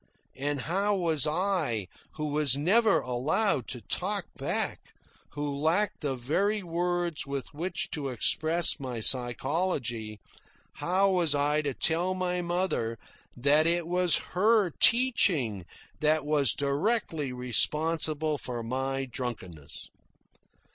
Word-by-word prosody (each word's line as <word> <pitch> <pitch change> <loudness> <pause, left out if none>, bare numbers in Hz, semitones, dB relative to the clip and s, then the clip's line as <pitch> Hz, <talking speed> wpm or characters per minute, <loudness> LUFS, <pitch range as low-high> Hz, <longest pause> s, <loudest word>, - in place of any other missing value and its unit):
And 140 +1 -2
how 200 +6 0
was 160 -5 +2
I, 155 - 0 0.3
who 155 - -4
was 145 -2 +2
never 205 +8 +3
allowed 130 - 0
to 125 - -5
talk - - -2
back, - - -2 0.5
who 145 -1 -3
lacked 165 +8 0
the 140 -4 -1
very 195 - 0
words 175 -2 -2
with 140 +2 -5
which 170 +4 -3
to 140 -3 -3
express 160 +8 +1
my 130 -4 -5
psychology 120 - 0 0.6
how 190 +2 +2
was 170 -5 +1
I 145 +1 +1
to 145 -3 -3
tell 175 +3 0
my 180 -1 -1
mother 170 -10 -1 0.4
that 145 +5 +3
it 170 0 +1
was 180 0 +2 0.2
her 205 0 +3
teaching 165 - +3 0.3
that 155 0 +2
was 145 -5 +2
directly 150 - -1
responsible 150 +5 +1
for 120 -2 -5
my 135 +3 -2
drunkenness? 110 - -7
150 Hz, 120 wpm, -28 LUFS, 130-180 Hz, 0.6 s, never